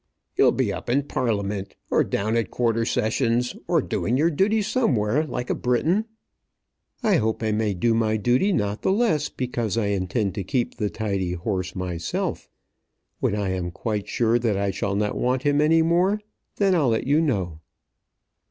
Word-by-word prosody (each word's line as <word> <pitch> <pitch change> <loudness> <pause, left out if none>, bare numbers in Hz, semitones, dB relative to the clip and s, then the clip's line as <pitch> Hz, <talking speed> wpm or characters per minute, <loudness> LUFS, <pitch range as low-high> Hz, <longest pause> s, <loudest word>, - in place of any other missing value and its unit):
"You'll - - +5
be - - 0
up - - -7
in 140 +4 +2
Parliament, 105 -7 -2 0.2
or - - +4
down 110 +3 -1
at 115 -1 0
Quarter 115 -1 0
Sessions, 115 +2 0
or - - +2
doing 120 +4 -1
your 160 +4 +3
duty 205 +7 +2
somewhere 150 - +1
like 125 -4 -3
a - - +3
Briton." 160 - +1 1.0
"I 210 -6 +4
hope 110 +1 -1
I 110 - +1
may 105 -2 0
do 115 +6 +2
my 110 -1 +1
duty 125 - +2
not 105 - -1
the - - +1
less 190 -9 +1
because 120 -4 -2
I 105 -3 +1
intend 100 +1 -1
to 100 - -3
keep 120 +6 -1
the 105 -3 -1
tidy 100 -5 -2
horse 95 +1 -3
myself. 90 -3 -3 0.7
When - - 0
I 100 -2 -1
am 90 -1 -2
quite 105 +3 -3
sure 120 0 +2
that 115 -4 0
I 100 0 0
shall 100 +1 -2
not 105 0 -1
want 125 +1 0
him 145 0 +3
any 160 +2 +4
more, 180 +5 +2 0.4
then 195 -2 +2
I'll 155 -8 +3
let 110 -1 0
you 145 +4 +3
know." 95 - -1
115 Hz, 180 wpm, -24 LUFS, 100-145 Hz, 1.0 s, You'll